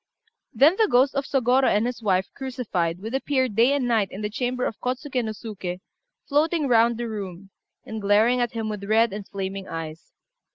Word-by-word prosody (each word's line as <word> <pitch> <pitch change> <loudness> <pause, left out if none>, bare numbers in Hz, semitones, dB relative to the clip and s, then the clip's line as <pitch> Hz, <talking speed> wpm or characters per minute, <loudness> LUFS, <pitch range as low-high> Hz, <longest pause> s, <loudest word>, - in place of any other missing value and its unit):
Then 310 +8 +4
the 440 - +4
ghost 260 +3 +4
of 275 -1 -1
Sôgorô 260 -1 +2
and 210 +2 +2
his 245 -1 -4
wife 190 -3 +2
crucified 205 -11 -3
would 225 +3 -5
appear 265 -1 +1
day 230 +3 +3
and 275 -3 0
night 225 -4 +2
in 195 - -8
the 210 0 -3
chamber 250 +2 -2
of 220 - -4
Kôtsuké 255 0 -2
no 220 - -3
Suké, 195 -5 -6 0.5
floating 305 +1 +1
round 235 -1 +4
the 240 0 -3
room, 195 -3 -7 0.3
and 220 -1 -6
glaring 215 +5 +3
at 240 -1 -1
him 225 -1 -3
with 210 -2 -5
red 220 +1 +3
and 205 -1 -6
flaming 195 0 -5
eyes. 160 0 -7
230 Hz, 195 wpm, -24 LUFS, 200-255 Hz, 0.5 s, Then